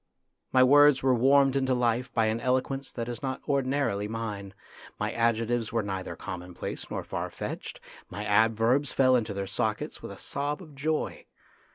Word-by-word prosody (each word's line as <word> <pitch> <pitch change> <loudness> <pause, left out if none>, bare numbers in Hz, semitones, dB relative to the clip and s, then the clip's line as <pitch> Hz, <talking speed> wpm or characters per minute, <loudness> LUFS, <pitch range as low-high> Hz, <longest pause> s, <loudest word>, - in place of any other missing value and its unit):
My 130 -1 +6
words 145 +1 +6
were 130 -1 +4
warmed 135 +2 +4
into 130 -1 +2
life 125 +1 0
by 115 -2 +2
an 110 +1 0
eloquence 130 +2 -1
that 115 -1 -4
is 120 -1 -5
not 130 -1 -3
ordinarily 135 -7 0
mine, 105 -3 -5 0.4
my - - -1
adjectives 115 0 0
were 115 -2 0
neither 95 -2 -4
common 90 0 -7
place - - -6
nor - - -3
far - - -4
fetched, - - -6 0.3
my 105 +3 -5
adverbs 115 +6 +3
fell 130 -1 +4
into 110 -4 -1
their 100 0 -2
sockets 95 - -2
with - - -7
a - - -9
sob 145 +1 -3
of 160 -6 -12
joy. 150 +3 -2
120 Hz, 175 wpm, -28 LUFS, 110-135 Hz, 0.4 s, My